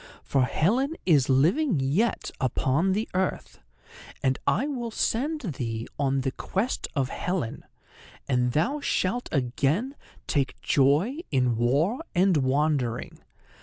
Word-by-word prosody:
"For 135 -2 +2
Helen 250 - +1
is 145 -7 +4
living 170 - +3
yet 155 - 0
upon 135 +8 +1
the 215 +3 -1
earth. 185 0 -2 0.6
And 130 0 +1
I 260 - +2
will 250 -5 -3
send 285 +8 -1
thee 120 - -4
on 135 -1 +1
the 135 0 -1
quest 200 - -2
of 135 -3 0
Helen, 180 -9 -3 0.6
and 125 -2 +1
thou 245 - +1
shalt 245 -3 -1
again 140 - 0 0.3
take 140 -3 -1
joy 150 - +2
in 125 -4 +2
war 145 - +1
and 185 -1 +4
wandering. 135 -3 0
150 Hz, 125 wpm, -26 LUFS, 130-220 Hz, 0.6 s, is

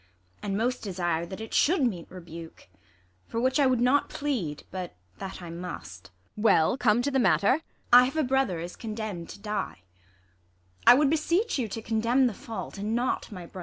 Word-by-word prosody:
And 200 -1 -2
most 245 +3 0
desire 175 -4 -2
that 190 +3 -7
it 220 0 -7
should 325 -1 +3
meet 190 -9 -1
rebuke; 170 - -11 0.6
For 230 - -3
which 260 +3 +2
I 280 - +5
would 255 -2 +2
not 255 +4 +3
plead, 220 - -3
but 185 -2 -5 0.2
that 190 -2 -7
I 170 - -7
must. 100 - -8 0.3
Ang. 210 - -7
Well, 195 -4 +4
come 240 -2 +2
to 285 - 0
the 265 - +2
matter! 245 +1 +4
IsAB. 325 - -16 0.3
I 245 +1 +10
have 270 +5 -4
a 310 - +3
brother 265 - +1
is 175 +2 -6
condemn'd 215 -6 -5
to - - -9
die. 210 - -4 1.0
I - - +11
would 285 +1 +3
beseech 335 +5 +1
you 240 - 0
to 220 +2 -6
condemn 230 +4 +2
the 240 - +1
fault, 220 0 -7
and 210 +3 -1
not 245 -1 -1
My 180 -4 -7
brother. 185 - -10
220 Hz, 200 wpm, -27 LUFS, 180-255 Hz, 1.0 s, I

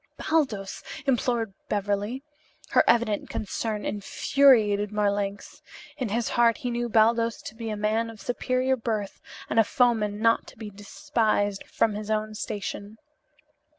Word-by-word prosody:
"Baldos!" 260 -12 -1 0.2
implored 240 -5 0 0.2
Beverly. 205 +5 -1 0.5
Her - - +5
evident 230 -3 +2
concern 215 0 -3
infuriated 210 -1 +3
Marlanx. 205 -1 -2 0.3
In 255 -7 -3
his 230 +3 -1
heart 235 -1 +3
he 245 - -3
knew 240 0 -2
Baldos 230 +1 +3
to - - -7
be 225 0 -6
a 215 - -3
man 215 +2 0
of 225 -2 -11
superior 255 +2 0
birth 220 -4 -3 0.3
and 225 - +1
a - - +7
foeman 220 -4 +1
not 230 +1 +2
to - - -14
be 215 -2 -7
despised 205 -1 -1
from 220 - +1
his 210 +1 -6
own 215 0 -1
station. 205 0 -5
220 Hz, 140 wpm, -26 LUFS, 205-235 Hz, 0.5 s, a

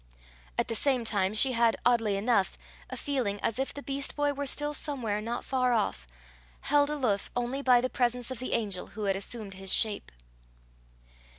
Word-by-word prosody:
At - - +1
the - - -2
same 250 +1 +2
time 200 -2 +1
she 260 +4 +6
had, 235 -2 +3
oddly 225 -4 +3
enough, 200 -1 +1 0.3
a - - -6
feeling 245 -8 -1
as 225 +2 -1
if 270 - -1
the 285 - -9
beast 275 0 -2
boy 290 -1 +1
were 285 0 -4
still 295 +2 0
somewhere 245 -9 -1
not 235 +2 -4
far 255 -2 +1
off, 200 - -1 0.5
held 290 0 +3
aloof 250 -10 -1
only 245 +3 -1
by 250 -3 +5
the 255 - 0
presence 245 0 0
of 255 - -5
the 255 - -3
angel 200 -5 -1
who 215 - -3
had 195 -1 +1
assumed 200 +1 -4
his 190 0 -4
shape. 215 -2 +2
240 Hz, 185 wpm, -29 LUFS, 210-270 Hz, 0.5 s, she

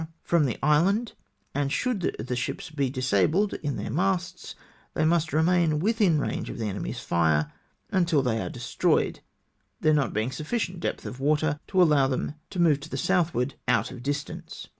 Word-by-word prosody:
from 170 -3 +3
the 120 - -3
island, 190 - +3 0.4
and 140 0 -1
should 230 - -1
the 125 +3 -3
ships 145 +7 -4
be 140 -4 0
disabled 130 - +1
in 145 -3 -2
their - - -4
masts, 180 +3 -1 0.4
they 155 - +2
must 165 -1 +2
remain 160 0 +3
within 200 -4 +2
range - - -3
of - - -6
the 115 - -3
enemy'' 100 -1 -3
s - - -6
fire 80 -3 +1 0.4
until 170 -6 +2
they 115 -3 0
are 90 - -3
destroyed - - 0 0.3
— - - -46
there 155 - +4
not 145 -5 +2
being 110 +4 -1
sufficient 175 - -3
depth - - -3
of 125 - -6
water 150 +1 +1
to 190 - 0
allow 150 -6 +5
them 135 +2 -2 0.2
to 185 - -6
move 160 -5 +4
to 150 +3 -10
the 135 - -4
southward 160 -5 +1
out - - +2
of 125 - -9
distance. 145 +2 -5
150 Hz, 180 wpm, -26 LUFS, 130-175 Hz, 0.4 s, allow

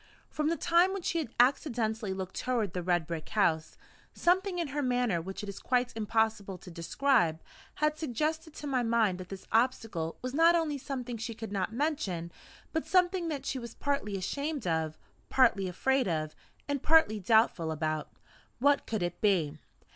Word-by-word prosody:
From 305 0 0
the 335 - 0
time 345 +3 +3
when 390 -3 -4
she 335 - 0
had 305 - -3
accidentally 235 -5 +2
looked 190 -1 -5
toward 230 -7 -1
the 180 - -2
red 175 -2 +1
brick 165 -1 -5
house, 160 -7 +1 0.4
something 370 +1 +2
in 335 -4 -1
her 290 +2 -2
manner 245 -9 +1
which 190 +4 -6
it - - -5
is 200 - -7
quite 250 -1 0
impossible 220 -3 0
to 180 - -12
describe, 170 - +1 0.4
had 300 0 0
suggested 310 +3 -2
to - - -7
my 265 -3 +1
mind 225 -5 +2
that 185 -1 -8
this 195 -1 -8
obstacle 225 -8 0
was 255 0 -3
not 330 +3 +5
only 310 -4 0
something 255 -3 -5
she 225 +1 -5
could 220 -1 -7
not 195 0 -1
mention, 225 - -2 0.4
but 320 - -1
something 360 -1 +2
that 285 -4 -4
she 265 - -2
was 235 -1 -8
partly 275 -8 -1
ashamed 280 +7 -3
of, 160 -2 -1 0.3
partly 230 -7 +4
afraid 265 +7 +1
of, 155 -3 -2 0.3
and 285 -2 -1
partly 305 -10 +4
doubtful 200 -5 +3
about. 155 -1 -2 0.5
What 285 +3 +3
could 220 -5 -1
it 175 0 -4
be? 165 -8 +2
230 Hz, 175 wpm, -30 LUFS, 185-285 Hz, 0.5 s, not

